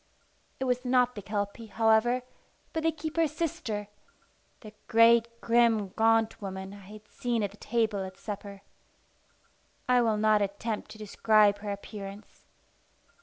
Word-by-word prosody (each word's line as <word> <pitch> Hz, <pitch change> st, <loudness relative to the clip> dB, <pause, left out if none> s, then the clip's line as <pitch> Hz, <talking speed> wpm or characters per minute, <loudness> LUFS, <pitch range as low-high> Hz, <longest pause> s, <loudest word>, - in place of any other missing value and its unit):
It -, -, -2 dB
was 250 Hz, -1 st, 0 dB
not 250 Hz, -1 st, +2 dB
the 205 Hz, -, -7 dB
Kelpie, 205 Hz, +2 st, -4 dB
however, 225 Hz, +3 st, +2 dB, 0.5 s
but 320 Hz, -, -1 dB
the 325 Hz, +1 st, +2 dB
keeper's 315 Hz, 0 st, -1 dB
sister, 225 Hz, -10 st, -3 dB, 0.7 s
the 215 Hz, -2 st, -11 dB
great, 230 Hz, 0 st, +5 dB
grim, 230 Hz, -4 st, +3 dB
gaunt 225 Hz, +2 st, +2 dB
woman 190 Hz, 0 st, -6 dB
I -, -, -10 dB
had 210 Hz, +2 st, -13 dB
seen 240 Hz, -3 st, -2 dB
at 200 Hz, -, -2 dB
the 205 Hz, -, -16 dB
table 220 Hz, -5 st, -1 dB
at 190 Hz, 0 st, -8 dB
supper. 200 Hz, -1 st, -7 dB, 1.2 s
I 250 Hz, -1 st, +4 dB
will 225 Hz, -2 st, +1 dB
not 215 Hz, 0 st, +3 dB
attempt 205 Hz, +2 st, -3 dB
to -, -, -11 dB
describe 210 Hz, -1 st, +3 dB
her 205 Hz, 0 st, -6 dB
appearance. 200 Hz, 0 st, -8 dB
220 Hz, 140 wpm, -29 LUFS, 205-240 Hz, 1.2 s, great